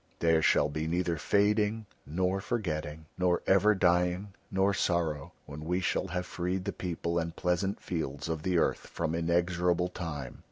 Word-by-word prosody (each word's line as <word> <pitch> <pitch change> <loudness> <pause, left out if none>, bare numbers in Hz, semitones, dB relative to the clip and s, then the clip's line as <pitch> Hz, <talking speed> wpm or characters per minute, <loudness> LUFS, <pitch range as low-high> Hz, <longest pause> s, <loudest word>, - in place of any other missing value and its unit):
There 80 -1 +3
shall 75 - +4
be 80 +2 -3
neither 85 0 0
fading 105 +6 +2 0.2
nor 90 +5 0
forgetting, 80 -9 -3
nor 90 -1 +2
ever 100 +3 +5
dying 90 +2 +2 0.2
nor 95 +1 +2
sorrow, 85 -6 0
when 75 +1 -8
we 90 +3 0
shall 95 - 0
have 90 +1 -3
freed 90 +1 -2
the - - -2
people 85 -1 -2
and 85 0 -3
pleasant 95 +3 0
fields 80 -4 -4
of 80 -2 -2
the 90 +1 +1
earth - - +1
from 80 - -2
inexorable 85 +1 +1
Time." 75 -8 -6
90 Hz, 160 wpm, -30 LUFS, 80-95 Hz, 0.2 s, ever